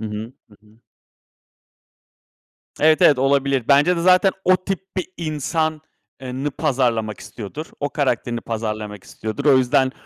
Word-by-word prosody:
Hı - - -5
hı, 110 +3 -6 0.2
hı 105 - -19
hı. 110 +2 -24 2.0
Evet, 155 0 +4
evet, 140 -4 +6
olabilir. 135 -2 +1
Bence 150 +5 +4
de - - -1
zaten 185 +2 +5
o 185 0 +6
tip 190 0 -3 0.2
bir 185 - -1
insan 155 0 -2 0.4
eee, 125 -1 -6
nı 140 +3 -3
pazarlamak 125 -7 -1
istiyordur. 120 +8 -8
O 145 - -1
karakterini 120 -4 -1
pazarlamak 110 -3 -5
istiyordur. 110 +6 -6
O 140 -3 +6
yüzden 130 +1 +2
135 Hz, 145 wpm, -21 LUFS, 115-155 Hz, 2.0 s, evet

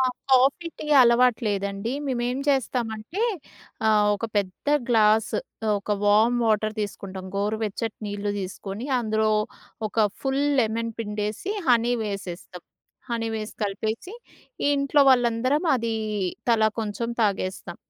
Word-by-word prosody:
ఆ! - - +4 0.3
Coffee, 265 +6 +4
tea - - -6
అలవాటు 245 0 +5
లేదండి. 200 +2 -2
మేమేం 245 0 -1
చేస్తామంటే 245 - -1 0.7
ఆహ్, 210 -1 +4
ఒక 205 - -5
పెద్ద 195 +2 -2 0.2
గ్లాస్ 220 -2 +4
ఆహ్, 225 - -4
ఒక 200 - -7
వార్మ్ 220 +4 +4
వాటర్ 215 0 +1
తీసుకుంటాం. 195 -2 -6
గోరువెచ్చటి 215 +2 -2
నీళ్లు 205 0 -3
తీసుకొని 195 +4 -6
అందులో 220 -1 +1 0.6
ఒక - - -20 0.3
ఫుల్ 270 +1 0 0.2
లెమన్ 230 0 -1
పిండేసి, 210 - -3 0.2
హనీ 240 0 +4
వేసేస్తాం. 185 -4 -6 0.5
హనీ 230 -1 -1
వేసి 215 0 -6
కలిపేసి, 220 - -3 0.6
ఇంట్లో 280 +1 +2
వాళ్ళందరం 250 +4 +2
అది 230 -2 -2 0.6
తలా 220 -1 +4
కొంచెం 220 +2 -3
తాగేస్తాం. 190 -3 -2
220 Hz, 115 wpm, -25 LUFS, 205-245 Hz, 0.7 s, అలవాటు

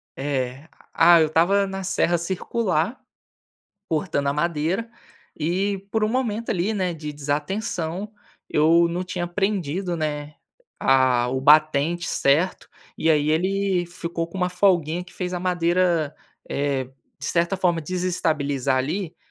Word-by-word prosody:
eh, 135 +1 -3 0.2
ah, 170 +1 +7
eu 160 - +4
estava 185 +6 +3
na 195 0 -5
serra 175 -2 +1
circular, 185 +2 -1 0.9
cortando 155 -3 -1
a 140 - +1
madeira, 170 +8 -1 0.4
e 190 +6 -1
por 220 0 +1
um - - +1
momento 230 -2 -1
ali, 195 +3 0
né, 185 -3 -1
de 150 -2 -6
desatenção, 165 +6 -3 0.4
eu 165 +3 +4
não 175 +2 -2
tinha 180 -1 -3
prendido, 180 -2 -1
né, 150 -1 -3 0.4
a 130 -2 +3
o 130 +1 -1
batente 155 +3 +4
certo, 155 +7 +1 0.3
e 160 - +2
aí 150 0 +3
ele 185 +1 +1
ficou 170 -1 -4
com 180 - -9
uma 180 -1 0
folguinha 180 -3 +2
que 180 - -15
fez 180 -1 -4
a 180 - -3
madeira, 175 -3 +1 0.4
eh, 140 -2 0 0.3
de 145 - -9
certa 170 +4 +1
forma, 175 -3 +1
desestabilizar 150 -6 -1
ali, 160 +7 -2
170 Hz, 135 wpm, -23 LUFS, 150-185 Hz, 0.9 s, ah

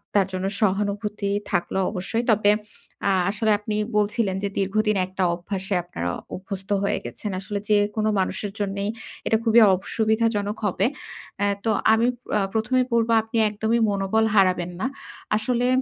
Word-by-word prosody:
তার 195 -2 +4
জন্য 185 +1 -2
সহানুভূতি 205 0 0 0.2
থাকল 175 -3 -1 0.2
অবশ্যই। 220 +4 -2
তবে 205 -1 +4 0.6
আ - - +4 0.2
আসলে 215 +1 0
আপনি 210 0 -3 0.2
বলছিলেন 210 -1 +1
যে, 200 - 0
দীর্ঘদিন 210 +2 +1
একটা 185 0 -2
অভ্যাসে 190 +2 -4
আপনারা 85 - -4 0.3
অভ্যস্ত 190 0 -7
হয়ে 200 - 0
গেছেন। 210 - -5
আসলে 200 +1 -4
যেকোনো 210 +1 +2
মানুষের 195 +2 -2
জন্যেই 200 0 -2 0.4
এটা 220 - +4
খুবই 230 0 +5
অসুবিধাজনক 220 +1 0
হবে। 195 +1 +1 0.6
এ - - +3 0.2
তো - - +2 0.2
আমি 225 +2 +3 0.3
আ - - +2
১ম 225 +3 -1
এই - - +1
বলব, 230 0 +2
"আপনি 225 +1 -4
একদমই 220 +3 0
মনোবল 200 +3 +1
হারাবেন 180 -2 +3
না।" 260 - +1 0.5
আসলে 245 +2 0
205 Hz, 150 wpm, -24 LUFS, 195-220 Hz, 0.6 s, খুবই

